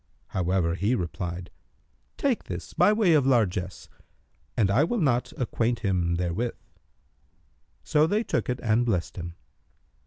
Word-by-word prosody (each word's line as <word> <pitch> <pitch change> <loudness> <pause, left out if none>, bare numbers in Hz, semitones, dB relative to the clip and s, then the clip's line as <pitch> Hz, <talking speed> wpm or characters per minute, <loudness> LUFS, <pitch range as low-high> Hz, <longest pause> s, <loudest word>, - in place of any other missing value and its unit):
However 90 -2 0
he 100 +7 +1
replied, 90 -2 -4 0.7
"Take 270 -5 0
this - - -6
by 205 - +5
way 210 -5 +4
of 145 -4 +4
largesse; 95 -7 0 0.7
and 100 -3 +3
I 125 +8 +4
will 215 +9 0
not 125 -7 +1
acquaint 120 -1 -1
him 90 -4 +1
therewith." 90 +7 -1 1.3
So 155 0 +3
they 210 +6 +1
took - - -1
it 125 0 -1
and 115 +1 +3
blessed 100 -8 -1
him. 85 -1 -6
110 Hz, 135 wpm, -26 LUFS, 90-135 Hz, 1.3 s, by